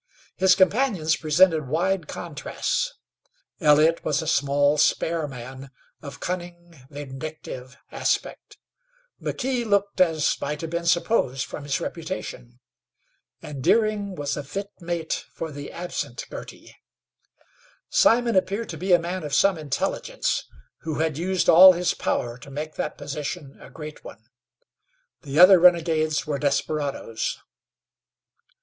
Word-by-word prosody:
His 190 Hz, 0 st, +4 dB
companions 190 Hz, -6 st, +2 dB
presented 160 Hz, -1 st, +3 dB
wide 170 Hz, +3 st, 0 dB
contrasts. 335 Hz, -, -3 dB, 0.6 s
Elliott 155 Hz, 0 st, +4 dB
was 150 Hz, -1 st, 0 dB
a 160 Hz, -, -3 dB
small, 145 Hz, 0 st, +2 dB
spare 160 Hz, +1 st, +1 dB
man 130 Hz, +1 st, -9 dB, 0.3 s
of 140 Hz, -, -9 dB
cunning, 175 Hz, -1 st, -6 dB, 0.2 s
vindictive 140 Hz, -2 st, -8 dB
aspect; -, -, -2 dB, 0.6 s
McKee 255 Hz, -2 st, -2 dB
looked, 200 Hz, -3 st, +1 dB
as 160 Hz, -4 st, +3 dB
might 150 Hz, +1 st, -3 dB
have 165 Hz, -1 st, -5 dB
been 170 Hz, 0 st, -2 dB
supposed 170 Hz, -, +1 dB
from 145 Hz, -, -8 dB
his 140 Hz, -1 st, -1 dB
reputation, 160 Hz, -8 st, -6 dB, 0.8 s
and 140 Hz, -3 st, -7 dB
Deering 210 Hz, -, +2 dB
was 145 Hz, -2 st, -2 dB
a 145 Hz, -, -5 dB
fit 200 Hz, +8 st, -6 dB
mate 170 Hz, -2 st, -3 dB
for 160 Hz, -, -6 dB
the 145 Hz, 0 st, -8 dB
absent 180 Hz, -, -5 dB
Girty. -, -, -10 dB, 1.1 s
Simon 235 Hz, -1 st, +3 dB
appeared 200 Hz, +4 st, 0 dB
to 165 Hz, -, -6 dB
be 185 Hz, +1 st, +1 dB
a -, -, +8 dB
man 175 Hz, +2 st, -4 dB
of 145 Hz, -2 st, -2 dB
some 190 Hz, +6 st, +4 dB
intelligence, 155 Hz, -4 st, -2 dB, 0.3 s
who 160 Hz, -2 st, -4 dB
had 160 Hz, -1 st, 0 dB
used 185 Hz, +1 st, 0 dB
all 185 Hz, +3 st, +10 dB
his 180 Hz, 0 st, 0 dB
power 120 Hz, +1 st, -2 dB
to 140 Hz, -, -12 dB
make 150 Hz, +3 st, -5 dB
that 150 Hz, -, -4 dB
position 145 Hz, 0 st, -6 dB
a -, -, -12 dB
great 150 Hz, +2 st, -9 dB
one. 110 Hz, -, -12 dB, 1.0 s
The 145 Hz, -2 st, -5 dB
other 185 Hz, +2 st, +9 dB
renegades 165 Hz, -3 st, +3 dB
were 145 Hz, -3 st, -2 dB
desperadoes. 145 Hz, -5 st, -2 dB
160 Hz, 130 wpm, -24 LUFS, 145-185 Hz, 1.1 s, all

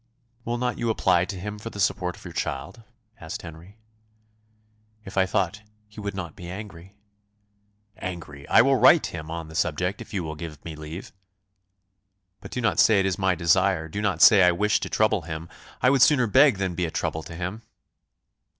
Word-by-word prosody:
"Will 120 Hz, +1 st, -2 dB
not 125 Hz, 0 st, -2 dB
you 120 Hz, -, -1 dB
apply 90 Hz, -5 st, +2 dB
to 95 Hz, 0 st, -6 dB
him 105 Hz, +3 st, -6 dB
for 115 Hz, -, -7 dB
the 105 Hz, -, -10 dB
support 90 Hz, -2 st, 0 dB
of -, -, -16 dB
your -, -, -8 dB
child?" 70 Hz, +11 st, -4 dB, 0.4 s
asked 95 Hz, +7 st, -7 dB
Henry. 85 Hz, +5 st, -12 dB, 1.3 s
"If 95 Hz, -, -9 dB
I 95 Hz, -1 st, +3 dB
thought 100 Hz, +1 st, -1 dB, 0.3 s
he 105 Hz, 0 st, -13 dB
would 100 Hz, -1 st, -5 dB
not 85 Hz, -5 st, -6 dB
be 90 Hz, -3 st, -9 dB
angry." 95 Hz, -1 st, -9 dB, 1.0 s
"Angry! 80 Hz, -6 st, -7 dB
I -, -, +6 dB
will 135 Hz, +1 st, +3 dB
write 160 Hz, +5 st, +6 dB
to -, -, -4 dB
him 80 Hz, -2 st, -7 dB
on 85 Hz, -1 st, -5 dB
the 80 Hz, -, -12 dB
subject 90 Hz, +4 st, -1 dB
if -, -, -10 dB
you 95 Hz, -4 st, -2 dB
will 80 Hz, -1 st, -5 dB
give 75 Hz, -2 st, -9 dB
me 80 Hz, -2 st, -6 dB
leave." 80 Hz, +4 st, -9 dB, 1.3 s
"But -, -, -11 dB
do 125 Hz, -, -4 dB
not 115 Hz, -, +1 dB
say 110 Hz, -3 st, +5 dB
it 95 Hz, -, +1 dB
is 95 Hz, -2 st, 0 dB
by -, -, -8 dB
my 95 Hz, -1 st, +2 dB
desire. 85 Hz, 0 st, +2 dB
Do 100 Hz, +6 st, -5 dB
not 105 Hz, -3 st, +1 dB
say 105 Hz, -4 st, +8 dB
I 90 Hz, -1 st, +6 dB
wish 105 Hz, +3 st, +1 dB
to -, -, -5 dB
trouble 110 Hz, -2 st, +2 dB
him. 80 Hz, +1 st, -7 dB, 0.4 s
I 125 Hz, -, +5 dB
would 135 Hz, -2 st, +2 dB
sooner 130 Hz, -2 st, +5 dB
beg 130 Hz, +1 st, +5 dB
than 95 Hz, -2 st, -2 dB
be 90 Hz, 0 st, -1 dB
a -, -, -3 dB
trouble 80 Hz, 0 st, -3 dB
to 85 Hz, -, -10 dB
him." 90 Hz, +6 st, -5 dB
95 Hz, 205 wpm, -25 LUFS, 85-105 Hz, 1.3 s, say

